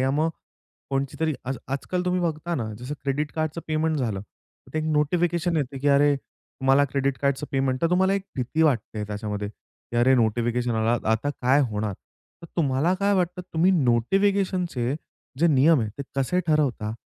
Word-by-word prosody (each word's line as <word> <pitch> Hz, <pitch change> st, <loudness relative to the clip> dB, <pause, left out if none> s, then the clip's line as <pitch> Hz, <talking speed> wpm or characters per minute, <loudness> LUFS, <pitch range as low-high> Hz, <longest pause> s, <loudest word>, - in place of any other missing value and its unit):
या 130 Hz, +1 st, +2 dB
मग, 155 Hz, +3 st, +1 dB, 0.6 s
कोणाची 135 Hz, 0 st, -1 dB
तरी 160 Hz, -1 st, +2 dB
आज 130 Hz, +1 st, -2 dB
आजकाल 180 Hz, +7 st, -2 dB
तुम्ही 180 Hz, 0 st, +1 dB
बघता 170 Hz, 0 st, -2 dB
ना, 110 Hz, -6 st, -3 dB
जसं 130 Hz, +4 st, -5 dB
क्रेडिट 145 Hz, +2 st, -1 dB
कार्डचं 155 Hz, +1 st, -2 dB
पेमेंट 155 Hz, 0 st, 0 dB
झालं, 110 Hz, -8 st, -1 dB
तर 105 Hz, -, -21 dB
ते -, -, +1 dB
एक 155 Hz, -, -1 dB
नोटिफिकेशन 170 Hz, +3 st, +1 dB
येतं 135 Hz, -2 st, -2 dB
की 145 Hz, -, +2 dB
अरे 145 Hz, +1 st, +5 dB
तुम्हाला 135 Hz, +1 st, 0 dB
क्रेडिट 140 Hz, -1 st, 0 dB
कार्डचं 140 Hz, +1 st, 0 dB
पेमेंट. 135 Hz, -1 st, 0 dB
तर 165 Hz, -, +2 dB
तुम्हाला 190 Hz, +2 st, +3 dB
एक 200 Hz, -, -1 dB
भीती 130 Hz, +6 st, 0 dB
वाटते 115 Hz, -7 st, 0 dB
त्याच्यामध्ये 105 Hz, 0 st, -4 dB
की 110 Hz, +3 st, -12 dB
अरे 125 Hz, +3 st, +5 dB
नोटिफिकेशन 120 Hz, +1 st, +1 dB
आला, 115 Hz, +2 st, +2 dB
आता 110 Hz, +6 st, +1 dB
काय 135 Hz, 0 st, +2 dB
होणार? 105 Hz, -1 st, -2 dB, 0.5 s
तर -, -, -8 dB
तुम्हाला 145 Hz, +2 st, +2 dB
काय 200 Hz, +2 st, +1 dB
वाटतं 180 Hz, -1 st, 0 dB
तुम्ही 170 Hz, +4 st, +3 dB
नोटिफिकेशनचे 175 Hz, -, +1 dB, 0.4 s
जे 170 Hz, -, +4 dB
नियम 150 Hz, -1 st, +5 dB
आहे 110 Hz, -, -1 dB
ते -, -, -2 dB
कसे 135 Hz, +7 st, +1 dB
ठरवता? 140 Hz, -9 st, +1 dB
140 Hz, 175 wpm, -25 LUFS, 125-165 Hz, 0.6 s, अरे